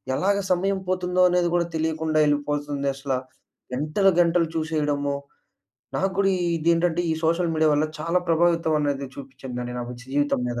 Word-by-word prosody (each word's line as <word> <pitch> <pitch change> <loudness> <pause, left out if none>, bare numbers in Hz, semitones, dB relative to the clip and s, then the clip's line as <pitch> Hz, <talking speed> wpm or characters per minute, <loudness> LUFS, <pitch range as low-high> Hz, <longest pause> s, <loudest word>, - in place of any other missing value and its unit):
ఎలాగా 200 +4 +1
సమయం 190 +2 +1
పోతుందో 180 0 +1
అనేది 180 0 +2
గూడా 170 -1 +1
తెలియకుండా 160 0 0
వెళ్ళిపోతుంది 145 -1 -1
అసలా. 135 -1 -2 0.6
గంటలు 155 +8 +2
గంటలు 170 0 +2
చూసేయడము 150 -3 -1 0.9
నాకు 195 +1 +1
గూడా 195 -1 +3 0.3
ఇది 165 +2 -1
ఏంటంటే 170 0 +1
ఈ - - +2
సోషల్ 170 +2 +2
మీడియా 155 0 +3
వల్ల 150 +1 +2
చాలా 165 +3 +1
ప్రభావితం 165 -1 +2
అనేది 140 -2 -1
చూపిచ్చిందండి 130 -3 -7
నాకు 120 0 -5
జీవితం 145 0 0
మీద. 120 0 -3
160 Hz, 145 wpm, -24 LUFS, 145-175 Hz, 0.9 s, గూడా